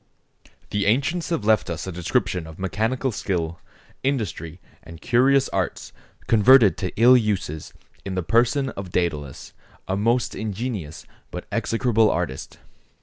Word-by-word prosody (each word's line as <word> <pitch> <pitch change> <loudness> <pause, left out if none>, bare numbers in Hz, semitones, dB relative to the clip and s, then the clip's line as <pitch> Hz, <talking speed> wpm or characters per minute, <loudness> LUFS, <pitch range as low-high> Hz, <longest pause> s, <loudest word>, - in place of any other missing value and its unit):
The 100 -1 0
ancients 140 +10 +1
have 165 -11 -2
left 110 -4 +3
us 85 - -4
a 95 - -5
description 90 0 -1
of 80 0 -11
mechanical 110 +8 -1
skill, 85 -5 -3 0.4
industry, 105 - -3 0.2
and 80 0 -12
curious 130 +5 +3
arts - - -3 0.3
converted 115 -1 +6
to 90 - -3
ill 125 +2 +8
uses, 100 -10 -1 0.3
in 95 -1 -5
the 90 - -1
person 120 - +2
of 100 -6 -7
Dædalus, 75 -7 -3 0.4
a 95 - -1
most 115 +4 +1
ingenious 105 - -5 0.2
but - - -7
execrable 115 -2 +2
artist. 85 -6 -3
105 Hz, 135 wpm, -23 LUFS, 90-120 Hz, 0.4 s, ill